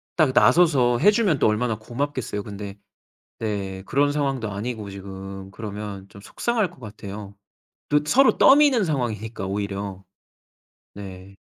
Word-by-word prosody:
딱 155 -6 +4
나서서 135 -10 +5
해주면 205 - +4
또 - - +4
얼마나 110 +1 0
고맙겠어요. 120 -3 -3
근데 100 -1 -8 0.6
네. 100 -3 -3
그런 145 +2 +2
상황도 135 -7 -1
아니고 105 0 -5
지금 95 0 -8
그러면 105 -2 -7
좀 100 0 -14
속상할 220 - -1
것 - - -19
같아요. 100 -2 -8 0.5
또 150 0 +4
서로 265 - +4
떠미는 270 -6 +6
상황이니까 115 - -3
오히려. 100 -1 -4 0.9
네. 95 -1 -10
110 Hz, 285 characters per minute, -24 LUFS, 100-145 Hz, 0.9 s, 떠미는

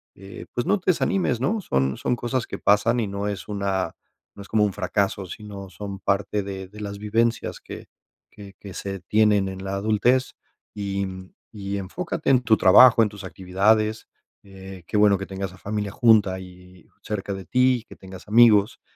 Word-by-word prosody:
eh, 95 +1 -11
pues, 120 - -2
no 205 -1 +2
te 185 0 +2
desanimes, 160 -8 0
¿no?, 210 +9 0
son 65 - 0
son 125 - -1
cosas 120 0 -2
que - - -6
pasan 115 +4 +3
y 110 - -1
no 100 +1 -4
es 100 -2 -6
una 100 -4 -2 0.4
no - - -9
es 100 - -12
como 105 -1 +3
un 100 - -2
fracaso, 95 0 -1
sino 100 0 -9
son 95 +2 -8
parte 100 +1 -1
de 95 -1 -7
de 105 +2 -12
las 100 -1 -5
vivencias 115 +2 -1
que - - -10 0.4
que 100 -1 -13
que 100 -2 -10
se 95 -1 -5
tienen 105 +1 +2
en 95 0 -8
la 95 - -3
adultez. 110 +6 +1 0.4
Y 100 -1 -3 0.5
y 100 -1 -4
enfócate 160 - -4
en 125 -2 +4
tu 110 -1 +4
trabajo, 115 +5 +7
en 110 - +1
tus 100 -2 -11
actividades, 105 +4 0 0.3
eh, 95 -2 -11
qué 105 - -1
bueno 105 -1 +5
que 95 - -6
tengas 95 0 -6
a - - -15
familia 105 +1 -4
junta 105 -5 +4
y 90 -1 -15 0.2
cerca 100 -1 -4
de 95 -1 -7
ti, 125 +3 +2
que - - -11
tengas 95 +1 -12
amigos, 110 -1 +5
100 Hz, 185 wpm, -23 LUFS, 95-110 Hz, 0.5 s, trabajo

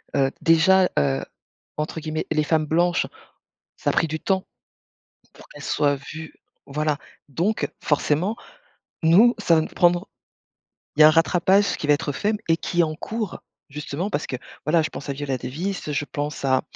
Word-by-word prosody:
heu, 135 -1 +2
déjà, 180 +3 +5
heu, 70 -1 +1 0.5
entre 150 +1 -3
guillemets, 155 0 -3
«les 155 - +2
femmes 155 0 +1
blanches», 175 +3 +1 0.7
ça - - -1
a - - -8
pris 165 - +2
du 160 0 -4
temps 190 +1 0 0.9
pour - - -16
qu'elles 145 - -12
soient 145 0 +1
vues 155 +3 -9 0.4
voilà, 150 +1 0 0.3
donc 175 - -1
forcément, 155 +8 +1 0.7
nous, 200 +10 +6
ça 175 -5 +3
va 160 - +4
nous - - -3
prendre 175 -1 +2 0.9
il - - -1
y - - +11
a - - +11
un - - +6
rattrapage 180 +4 +3
qui - - -4
va 145 - +6
être 145 0 -2
fait 205 +9 0
m 215 - -1
et 165 - +4
qui 175 +1 -1
est - - +7
en 155 -1 -3
cours 215 +1 -4 0.3
justement 150 +6 -4
parce 145 - -2
que, 130 - -3 0.3
voilà, 160 +2 +4
je 155 - -3
pense 140 - -8
à - - 0
Viola 135 -2 -3
Davis, 165 +7 -4
je 145 - -1
pense 145 -1 -5
à 130 -1 +3
160 Hz, 185 wpm, -23 LUFS, 145-175 Hz, 0.9 s, y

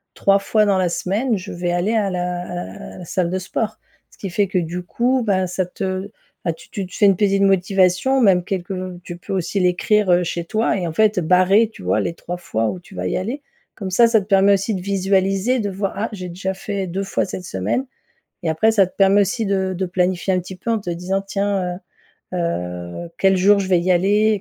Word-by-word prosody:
3 195 0 +3
fois 210 +2 +2
dans 200 -2 +2
la 180 -1 +1
semaine, 210 +7 0
je 190 +2 -7
vais 175 0 -2
aller 175 +5 0
à 210 -3 +1
la 180 -1 -2
à 180 - -7 0.2
l - - -11
à - - -12
la 180 - -9
salle 175 +1 -1
de 185 - -1
sport». 210 +3 -3 0.3
Ce - - -22
qui 195 - -6
fait 200 +3 +1
que 190 - -2
du 175 +1 -2
coup 245 +8 0
bah, 190 -4 +1
ça 180 0 -2
te 190 +1 -4 0.3
bah 170 - 0
tu 160 - -17
tu 195 -4 -4
te 185 - -11
fais 210 - +3
une 195 -1 +6
petite 195 +1 +2
motivation, 195 +5 +3
même 190 -7 +4
quelques 185 0 -3 0.3
tu 175 - -7
peux 180 - -7
aussi 190 +1 -1
l'écrire, 185 +3 +2
heu, 175 0 +4
chez 170 0 -3
toi 215 +6 0
et 180 -3 -2
en 160 - -4
fait, 215 +1 +3
heu, - - -1
barrer 185 +6 +4
tu - - -13
vois 95 +4 +1
les 135 +11 -2
3 175 +1 -6
fois 115 -10 -2
où 185 - -5
tu 180 +2 -16
vas - - -4
y - - -1
aller. 245 +10 -3 0.3
Comme 190 -3 -5
ça, 235 +6 +6
ça 230 -1 +4
te - - -9
permet 200 0 +4
aussi 200 +3 0
de 185 - -3
visualiser, 195 +4 +1
de 205 -2 -1
voir: 195 0 -3
«Ah 210 +3 -2
j'ai 185 -4 -6
déjà 190 +2 -3
fait 200 -2 -4
2 190 +3 -3
fois 195 - -1
cette 185 -1 -6
semaine» 100 - -2 0.6
et - - -1
après, 160 +8 +3
ça 205 -3 +4
te - - -20
permet 195 +1 +5
aussi 220 +4 0
de 190 -1 0
de 190 - -1
planifier 180 +1 0
un 185 - +2
petit 185 +1 -8
peu 190 +6 -3
en 225 - +1
te 195 - -6
disant: 180 +3 -2
«Tiens, 195 -3 -1
heu - - -10 0.5
heu, 90 - -3
quel 190 -1 +3
jour 200 +3 +5
je 195 - -2
vais 185 -2 +3
y 185 +2 +1
aller?» 205 +4 +3
190 Hz, 245 wpm, -20 LUFS, 180-200 Hz, 0.6 s, une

